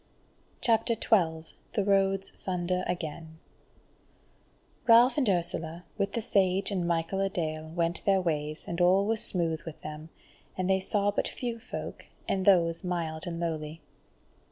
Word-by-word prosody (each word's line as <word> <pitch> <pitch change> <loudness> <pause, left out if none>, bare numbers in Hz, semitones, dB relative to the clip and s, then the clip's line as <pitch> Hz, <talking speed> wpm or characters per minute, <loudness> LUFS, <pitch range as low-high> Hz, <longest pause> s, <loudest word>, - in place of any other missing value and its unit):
CHAPTER 230 0 +3
12 165 -8 +1 0.2
The 210 -4 +1
Roads 195 -1 +2
Sunder 180 0 -2
Again 160 -2 -5 1.5
Ralph 240 +2 +7
and 260 -7 +2
Ursula, 170 -2 -1
with 200 -1 -1
the 230 - -2
Sage 195 -2 +2
and 180 -3 -1
Michael 170 +3 0
a 195 - +1
dale 155 -3 -3
went 170 +1 -1
their 195 -1 +4
ways, 155 -3 -2
and 170 +1 -2
all 185 +3 +5
was 220 +1 +1
smooth 165 -3 -1
with 165 -2 -9
them, 155 +1 -8 0.5
and 185 -1 0
they 190 0 +3
saw 200 +1 +1
but - - -1
few 235 -2 -4
folk, 230 - -7 0.2
and 190 -1 0
those 170 -3 +4
mild 170 -2 -3
and 170 -1 -4
lowly. 160 -1 -4
180 Hz, 150 wpm, -29 LUFS, 165-195 Hz, 1.5 s, Ralph